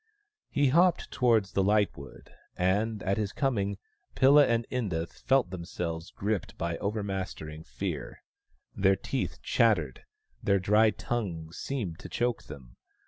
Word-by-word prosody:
He 140 -2 +2
hopped 175 +5 +3
towards 115 -6 +2
the 95 - +1
lightwood, 100 -8 -1 0.3
and 105 +4 +1
at 95 +1 0
his 105 -2 -1
coming 100 -8 0 0.4
Pilla 140 +2 +6
and 115 0 +1
Inda 95 -10 -1
felt 130 -4 +1
themselves 85 -2 -4
gripped 100 -2 -3
by 85 0 -2
overmastering 95 -7 -4
fear. - - -5 0.5
Their 95 0 +4
teeth - - -4
chattered; 90 - +2 0.4
their 100 - +3
dry 105 +4 +4
tongues 85 -9 -4
seemed 105 -12 -3
to - - -9
choke 120 -1 -1
them. 60 -3 -12
100 Hz, 130 wpm, -29 LUFS, 85-115 Hz, 0.5 s, Pilla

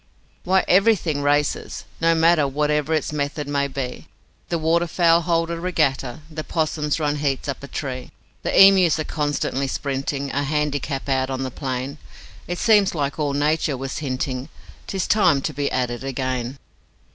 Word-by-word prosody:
'Why, 190 +1 +3
EVERYTHING 185 -6 +3
races, 145 +1 0
no 165 0 +3
matter 160 -2 +4
Whatever 150 +2 0
its 155 0 -2
method 145 0 -2
may 140 -1 0
be: 130 -2 -5 0.4
The 170 - 0
waterfowl 170 +1 +3
hold 165 0 0
a 170 - -3
regatta; 155 -6 -1
The 155 0 -5
'possums 155 -2 -1
run 150 -1 0
heats 140 -2 -1
up 140 - -4
a 140 - -8
tree; 130 -3 -5 0.3
The - - -2
emus 190 -5 +6
are 155 - -1
constantly 145 -3 -1
sprinting 140 +1 -3
A 145 - 0
handicap 145 -1 -2
out 130 -1 +1
on 130 0 -2
the 130 - -4
plain; 130 +2 -4 0.5
It 175 - -3
seems 205 -4 +4
like 145 0 -2
all 145 -2 0
nature 150 0 +1
was 135 +1 -4
hinting, 130 -1 -3 0.4
'Tis 190 -2 -2
time 205 -10 +4
to - - -2
be 140 +1 -2
at 125 -1 0
it 120 +2 -6
again. 130 -1 -3
145 Hz, 165 wpm, -22 LUFS, 135-160 Hz, 0.5 s, emus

